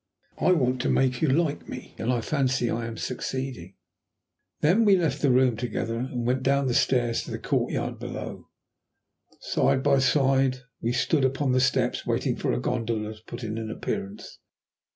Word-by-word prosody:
I 185 - +4
want 130 -6 +1
to - - 0
make 130 -2 +2
you 160 - +3
like 150 +1 0
me, - - -8
and 115 - 0
I 120 -2 0
fancy 130 -2 0
I 115 0 -2
am 115 -1 -6
succeeding." 125 -7 -4 0.9
Then 180 +10 +4
we 205 -3 +6
left 155 -5 0
the 145 - +3
room 125 -1 +4
together, 115 0 -3
and 125 -1 -3
went 130 +2 +1
down 140 +1 +2
the 125 - 0
stairs 120 -2 +2
to - - -9
the - - -3
courtyard - - -1
below. - - -7 0.9
Side 130 - +1
by 140 -1 +4
side 135 -1 +2 0.2
we 115 - 0
stood 140 +3 +1
upon 135 +1 +1
the 130 - +3
steps 130 - +1
waiting - - 0
for - - -1
a - - 0
gondola 110 - -2
to 110 0 -18
put 120 +1 -7
in 110 0 -3
an 110 -1 -5
appearance. 100 -2 -5
130 Hz, 180 wpm, -26 LUFS, 115-135 Hz, 0.9 s, we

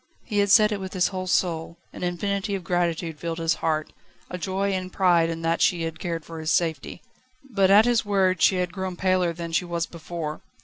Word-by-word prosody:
He 210 -3 -1
had 200 0 +2
said 215 +1 +6
it 205 - -2
with 190 -1 -6
his 180 -2 +2
whole 185 -1 -5
soul, 170 -2 0 0.2
an - - -9
infinity 200 +3 -2
of 190 - -5
gratitude 170 -2 -1
filled 165 0 -4
his 165 -1 +1
heart, 155 -1 -1 0.4
a 180 - -3
joy 195 +3 -1
and 185 -1 -3
pride 175 -4 +3
in 165 0 -5
that 165 +1 0
she 170 -2 +2
had 165 0 -5
cared 165 -3 -4
for 165 -1 -8
his 155 0 -3
safety. 165 -1 -1 0.5
But 195 -3 +3
at 205 +3 +7
his 240 -1 +2
words 190 -4 +1
she 190 - +5
had 180 -1 -1
grown 190 -1 -4
paler 185 -1 +1
than 170 0 -6
she 165 - +1
was 170 -1 -2
before. 165 -2 -6
175 Hz, 220 wpm, -25 LUFS, 165-190 Hz, 0.5 s, at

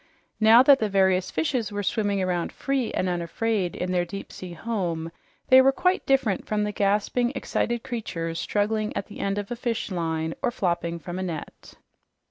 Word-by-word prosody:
Now 225 +3 +7
that 275 0 +6
the 215 - 0
various 190 -1 +2
fishes 255 -9 -1
were 205 0 -3
swimming 200 -1 0
around 180 -2 -1
free 270 -3 -1
and 185 - -1
unafraid 180 +2 -1
in 180 0 -3
their 180 -1 +2
deep 195 +3 -7
sea 180 -2 -8
home, 170 -5 -3 0.4
they 260 0 +9
were 270 +1 +5
quite 365 +7 0
different 265 -8 +1
from 210 -1 0
the 210 - -1
gasping, 210 +5 +1
excited 240 -3 -1
creatures 165 -9 -4
struggling 215 +1 -1
at - - -2
the 205 - -11
end 195 0 -1
of 205 +1 -4
a - - -1
fishline 170 -9 -2
or - - +1
flopping 170 -7 -1
from 175 +2 -6
a - - -2
net. 165 -4 -7
205 Hz, 180 wpm, -25 LUFS, 180-230 Hz, 0.4 s, they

